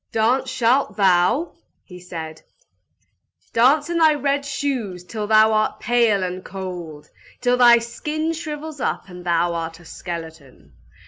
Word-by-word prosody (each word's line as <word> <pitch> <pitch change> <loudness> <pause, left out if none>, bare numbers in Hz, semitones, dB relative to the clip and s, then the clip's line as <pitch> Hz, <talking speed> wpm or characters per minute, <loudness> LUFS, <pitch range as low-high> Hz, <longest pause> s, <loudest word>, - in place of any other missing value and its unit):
"Dance 250 +4 +1
shalt 255 +2 +1
thou!" 195 - +2 0.5
said 160 -3 -8
he. - - -42
"Dance 275 +6 +4
in 340 0 -1
thy 315 -2 +5
red 285 -1 0
shoes 255 -10 -3
till 210 +3 -5
thou 220 0 +5
art 215 0 0
pale 230 -4 +2
and 185 0 -4
cold! 180 -6 -8 0.3
Till 245 0 +2
thy 240 -1 +7
skin 300 +7 -3
shrivels 310 -2 -6
up - - -2
and 180 0 -10
thou 170 0 +1
art 165 0 -5
a 175 - -17
skeleton! 160 - -9
220 Hz, 140 wpm, -21 LUFS, 175-275 Hz, 0.5 s, thy